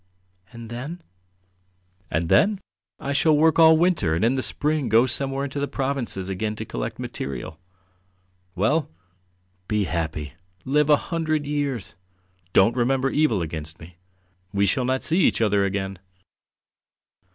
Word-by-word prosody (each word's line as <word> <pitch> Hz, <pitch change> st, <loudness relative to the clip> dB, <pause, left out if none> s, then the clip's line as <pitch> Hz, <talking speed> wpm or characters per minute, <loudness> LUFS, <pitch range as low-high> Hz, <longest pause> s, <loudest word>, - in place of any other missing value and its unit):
"And 115 Hz, -1 st, -10 dB
then?" 145 Hz, +9 st, -6 dB, 1.1 s
"And 80 Hz, +1 st, -1 dB
then? 200 Hz, -, +3 dB, 0.4 s
I 140 Hz, -, -3 dB
shall 150 Hz, +2 st, +3 dB
work 160 Hz, +2 st, +3 dB
all 160 Hz, 0 st, +8 dB
the 160 Hz, -, +1 dB
winter 160 Hz, -, +2 dB
and 85 Hz, -, +1 dB
in 120 Hz, -, +3 dB
the 135 Hz, -, -1 dB
spring 150 Hz, -1 st, 0 dB
go 115 Hz, +3 st, +5 dB
somewhere 135 Hz, +2 st, -1 dB
into 140 Hz, 0 st, -4 dB
the 140 Hz, -, -1 dB
provinces 130 Hz, -10 st, -3 dB
again 105 Hz, +3 st, -3 dB
to 110 Hz, -, -5 dB
collect -, -, -5 dB
material. 70 Hz, +4 st, -6 dB, 1.0 s
Well, 140 Hz, -, +1 dB, 0.8 s
be 105 Hz, -1 st, +1 dB
happy, 80 Hz, -5 st, -3 dB, 0.3 s
live 150 Hz, +2 st, +2 dB
a 150 Hz, -, +7 dB
hundred 155 Hz, -3 st, -2 dB
years... 145 Hz, -7 st, -2 dB, 0.6 s
don't 105 Hz, +6 st, +4 dB
remember 130 Hz, +2 st, +1 dB
evil 120 Hz, -, +2 dB
against 80 Hz, 0 st, -7 dB
me. 85 Hz, +2 st, -13 dB, 0.5 s
We 100 Hz, +1 st, +2 dB
shall 125 Hz, +6 st, +1 dB
not 130 Hz, +1 st, 0 dB
see 170 Hz, +3 st, +3 dB
each 180 Hz, -, +3 dB
other 105 Hz, -3 st, +2 dB
again." 95 Hz, -1 st, -3 dB
125 Hz, 145 wpm, -24 LUFS, 95-145 Hz, 1.1 s, all